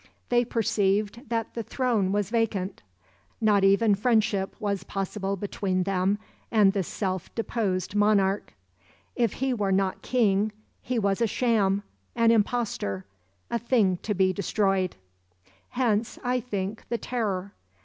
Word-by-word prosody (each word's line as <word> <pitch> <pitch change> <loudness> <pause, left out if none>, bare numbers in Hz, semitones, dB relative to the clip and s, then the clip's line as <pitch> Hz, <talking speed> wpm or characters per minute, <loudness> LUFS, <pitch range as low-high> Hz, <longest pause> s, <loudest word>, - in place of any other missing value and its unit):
They 240 0 +4
perceived 220 0 0
that 230 -1 -2
the 235 - -3
throne 225 -4 0
was 205 0 0
vacant—not 195 - -1
even 200 +2 +5
friendship 210 -2 +1
was 200 -4 -2
possible 195 +1 -3
between 190 -1 -1
them 195 +1 +1 0.3
and 205 -3 +4
the 200 - +1
self 185 0 -3
deposed 200 -6 -1
monarch. 205 -1 +2 0.6
If 235 -4 +1
he 265 0 -1
were 205 -5 0
not 190 0 +1
king 215 -4 +2 0.3
he 250 -1 -2
was 200 -1 +1
a 230 - +4
sham, 205 -4 +1 0.3
an 230 -1 +4
imposter, 210 - 0 0.5
a 235 - +1
thing 220 -6 +2
to 210 +3 -3
be 185 0 +3
destroyed. 195 -1 0 0.7
Hence, 235 -3 0
I 250 +1 +1
think, 210 -3 -4
the 235 - 0
Terror. 200 -6 -2
205 Hz, 130 wpm, -27 LUFS, 195-230 Hz, 0.7 s, even